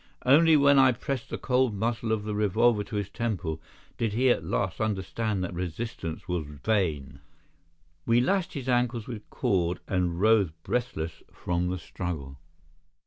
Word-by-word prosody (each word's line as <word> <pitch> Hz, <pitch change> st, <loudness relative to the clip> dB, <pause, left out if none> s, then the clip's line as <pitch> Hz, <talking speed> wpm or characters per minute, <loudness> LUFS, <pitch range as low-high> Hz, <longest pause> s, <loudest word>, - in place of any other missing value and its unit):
Only 155 Hz, +4 st, +6 dB
when 140 Hz, -1 st, +6 dB
I 130 Hz, -1 st, +6 dB
pressed 130 Hz, +1 st, -4 dB
the -, -, -3 dB
cold 125 Hz, -3 st, +1 dB
muzzle 115 Hz, +2 st, -1 dB
of 110 Hz, -2 st, 0 dB
the 105 Hz, 0 st, -3 dB
revolver 105 Hz, +2 st, +2 dB
to 105 Hz, -, -7 dB
his 100 Hz, -2 st, -1 dB
temple 90 Hz, -10 st, -3 dB, 0.4 s
did 115 Hz, -3 st, 0 dB
he 125 Hz, +3 st, +3 dB
at -, -, 0 dB
last 90 Hz, 0 st, -2 dB
understand 105 Hz, 0 st, -1 dB
that 90 Hz, -, -4 dB
resistance 90 Hz, -1 st, -5 dB
was 90 Hz, -5 st, -2 dB
vain. 75 Hz, -4 st, -1 dB, 0.9 s
We 115 Hz, +1 st, +5 dB
lashed 185 Hz, +7 st, +1 dB
his 135 Hz, -4 st, -5 dB
ankles 120 Hz, -3 st, +1 dB
with 110 Hz, -4 st, -8 dB
cord, 90 Hz, -2 st, 0 dB
and 90 Hz, -2 st, 0 dB
rose 110 Hz, -3 st, +4 dB
breathless 80 Hz, -10 st, -3 dB
from 90 Hz, 0 st, -2 dB
the 90 Hz, -, -2 dB
struggle. 80 Hz, -6 st, -6 dB
105 Hz, 155 wpm, -27 LUFS, 90-120 Hz, 0.9 s, Only